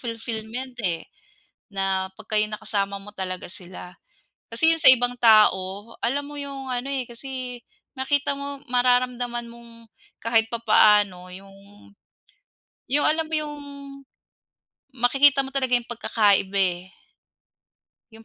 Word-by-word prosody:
fulfillment 230 Hz, +2 st, -5 dB
eh, 175 Hz, -6 st, -2 dB, 0.7 s
na 190 Hz, -1 st, -1 dB
'pag -, -, -15 dB
kayo 210 Hz, -, +4 dB
nakasama 200 Hz, -2 st, -2 dB
mo 200 Hz, -, -12 dB
talaga 185 Hz, -2 st, -5 dB
sila. 180 Hz, 0 st, -10 dB, 0.5 s
Kasi 320 Hz, +8 st, +3 dB
yun 325 Hz, -, 0 dB
sa -, -, +7 dB
ibang 245 Hz, -1 st, +5 dB
tao, 215 Hz, -1 st, +4 dB
alam 275 Hz, +5 st, -1 dB
mo 290 Hz, 0 st, -8 dB
yung 275 Hz, -2 st, -6 dB
ano 250 Hz, +2 st, -3 dB
eh, 270 Hz, -2 st, -2 dB
kasi 250 Hz, 0 st, -7 dB, 0.3 s
nakita 285 Hz, +1 st, 0 dB
mo 280 Hz, 0 st, -6 dB
mararamdaman 245 Hz, -1 st, +1 dB
mong 230 Hz, -1 st, -16 dB, 0.3 s
kahit 225 Hz, -1 st, +2 dB
papaano 210 Hz, -5 st, +3 dB
yung 195 Hz, +2 st, -12 dB, 1.3 s
yung 290 Hz, +3 st, +1 dB
alam 315 Hz, +1 st, +1 dB
mo 315 Hz, -, -4 dB
yung 300 Hz, -1 st, -2 dB, 1.4 s
makikita 275 Hz, +3 st, +4 dB
mo 270 Hz, -, -9 dB
talaga 260 Hz, -2 st, 0 dB
yung 240 Hz, -, -7 dB
pagkakaiba 205 Hz, -4 st, +1 dB, 0.2 s
eh, 185 Hz, -, -17 dB, 1.3 s
yung 225 Hz, 0 st, -15 dB
235 Hz, 125 wpm, -24 LUFS, 205-265 Hz, 1.4 s, sa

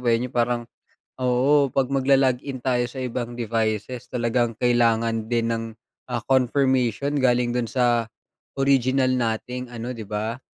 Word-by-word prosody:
ba 120 Hz, -2 st, +2 dB
'yon 125 Hz, +2 st, -4 dB
parang 120 Hz, -1 st, 0 dB, 0.6 s
Oo 130 Hz, +3 st, +3 dB
'pag 135 Hz, +1 st, -1 dB
maglo-log-in 135 Hz, -1 st, +1 dB
tayo 125 Hz, -2 st, +1 dB
sa 130 Hz, +1 st, -6 dB
ibang 120 Hz, -1 st, -4 dB
devices 115 Hz, +1 st, -2 dB
talagang 120 Hz, -1 st, 0 dB
kailangan 115 Hz, -2 st, +1 dB
din 115 Hz, -1 st, 0 dB
ng, 115 Hz, 0 st, -2 dB, 0.4 s
ah, 120 Hz, -4 st, -3 dB
confirmation 130 Hz, -1 st, +1 dB
galing 125 Hz, -2 st, +2 dB
do'n 120 Hz, -1 st, -1 dB
sa 120 Hz, -2 st, +1 dB, 0.5 s
original 135 Hz, -1 st, +2 dB
nating 125 Hz, +1 st, -2 dB
ano 120 Hz, 0 st, -6 dB
di 115 Hz, -4 st, -7 dB
ba, 110 Hz, +4 st, -3 dB
125 Hz, 135 wpm, -23 LUFS, 115-130 Hz, 0.6 s, Oo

